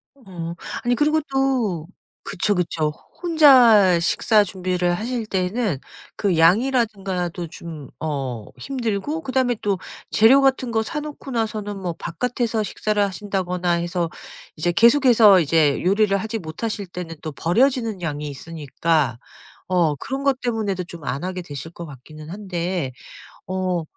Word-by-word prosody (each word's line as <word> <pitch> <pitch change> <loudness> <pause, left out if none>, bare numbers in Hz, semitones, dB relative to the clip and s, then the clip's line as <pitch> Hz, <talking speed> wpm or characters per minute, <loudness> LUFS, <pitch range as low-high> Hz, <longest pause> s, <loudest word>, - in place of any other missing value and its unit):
어. 175 -9 -7 0.3
아니 245 0 +2
그리고 305 +2 +2
또 245 -12 0 0.4
그쵸, 205 +1 0
그쵸. 165 -3 0
호 150 - -12 0.2
혼자 245 - +6
식사 210 +4 +3
준비를 180 -2 -1
하실 235 +2 -3
때에는 190 - -1 0.4
그 190 -5 +1
양이라든가 195 -2 +2
또 170 0 -6
좀 160 -4 -9
어 135 -8 -3
힘들고 255 - -3
그다음에 255 -3 0
또 200 -3 0 0.3
재료 255 +6 +6
같은 265 -3 +2
거 220 0 +1
사놓고 295 -1 -6
나서는 215 -3 -2
뭐 175 -3 -3
바깥에서 225 +6 -2
식사를 210 0 -1
하신다거나 185 -2 -1
해서 170 0 -1 0.5
이제 175 +3 0
계속해서 230 -3 +6
이제 155 -2 +2
요리를 200 +2 +3
하지 220 +3 -3
못하실 200 +5 -4
때는 180 -2 -7
또 155 - -5
버려지는 225 - +1
양이 150 -2 -3
있으니까 150 -2 -1 0.5
어 170 -5 +2
그런 270 - -5
것 270 -2 +1
때문에도 215 -6 -1
좀 170 -4 -11
안 140 +6 -3
하게 185 0 -3
되실 160 0 -8
것 170 0 -8
같기는 155 +2 -12
한데 180 -6 -3 0.6
어 185 -2 -1
190 Hz, 295 characters per minute, -22 LUFS, 170-230 Hz, 0.6 s, 혼자